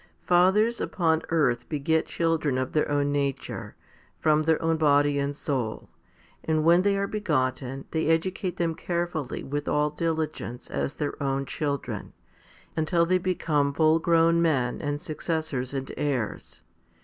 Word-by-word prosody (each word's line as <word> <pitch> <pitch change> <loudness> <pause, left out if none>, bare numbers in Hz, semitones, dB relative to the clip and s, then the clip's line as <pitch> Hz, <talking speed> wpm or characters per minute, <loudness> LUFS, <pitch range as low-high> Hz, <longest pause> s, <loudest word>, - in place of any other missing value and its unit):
Fathers 190 +6 +3
upon 160 -3 +1
earth 125 -7 +1
beget 160 +1 0
children 165 -5 0
of 130 0 -2
their 150 - +1
own 145 0 +1
nature, 140 -2 -3 0.4
from 155 -1 +3
their 160 0 +2
own 165 0 +1
body 145 -2 +3
and 140 +1 -1
soul, 130 -7 -3 0.5
and 155 -1 +1
when 170 +2 +6
they 200 +1 +2
are 200 - 0
begotten 135 -9 -1
they 160 -1 0
educate 180 +3 0
them 170 -1 0
carefully 170 -4 -3
with 145 +1 -4
all 150 0 +1
diligence 155 -6 -3
as 140 - -2
their 145 -1 -4
own 135 0 0
children, 140 0 -3 0.6
until 170 +2 +2
they 185 +2 +2
become 150 -6 0
full 160 +1 +4
grown 165 0 +3
men 135 -7 +1
and 145 0 -2
successors 155 -5 -3
and 135 -1 -4
heirs. 135 -7 -3
155 Hz, 145 wpm, -26 LUFS, 140-165 Hz, 0.6 s, when